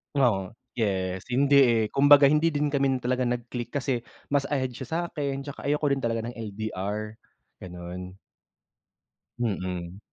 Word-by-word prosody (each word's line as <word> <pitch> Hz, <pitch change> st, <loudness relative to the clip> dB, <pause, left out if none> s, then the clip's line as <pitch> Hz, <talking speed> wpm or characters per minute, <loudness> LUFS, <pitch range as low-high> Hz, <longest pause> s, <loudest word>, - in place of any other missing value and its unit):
Oo, 105 Hz, -8 st, +2 dB, 0.2 s
yes. 95 Hz, -4 st, -1 dB
Hindi 140 Hz, +3 st, +4 dB
eh. 115 Hz, -3 st, +3 dB
Kumbaga 140 Hz, +4 st, +7 dB
hindi 150 Hz, +3 st, +3 dB
din 150 Hz, 0 st, 0 dB
kami 135 Hz, -2 st, +1 dB
talaga 125 Hz, +1 st, 0 dB
nag-click, 120 Hz, 0 st, -3 dB
kasi 130 Hz, -4 st, -1 dB, 0.2 s
mas 140 Hz, -1 st, +1 dB
ahead 130 Hz, -3 st, -1 dB
siya 170 Hz, +6 st, -3 dB
sa'kin, 140 Hz, -4 st, -3 dB
tsaka 140 Hz, 0 st, -8 dB
ayoko 150 Hz, +1 st, +1 dB
rin 140 Hz, -1 st, 0 dB
talaga 115 Hz, 0 st, -1 dB
ng 120 Hz, -, -7 dB
LDR, 105 Hz, -1 st, -4 dB, 0.5 s
gano'n. 90 Hz, 0 st, -7 dB, 1.3 s
Mm. 90 Hz, -4 st, -3 dB
120 Hz, 135 wpm, -27 LUFS, 105-140 Hz, 1.3 s, Kumbaga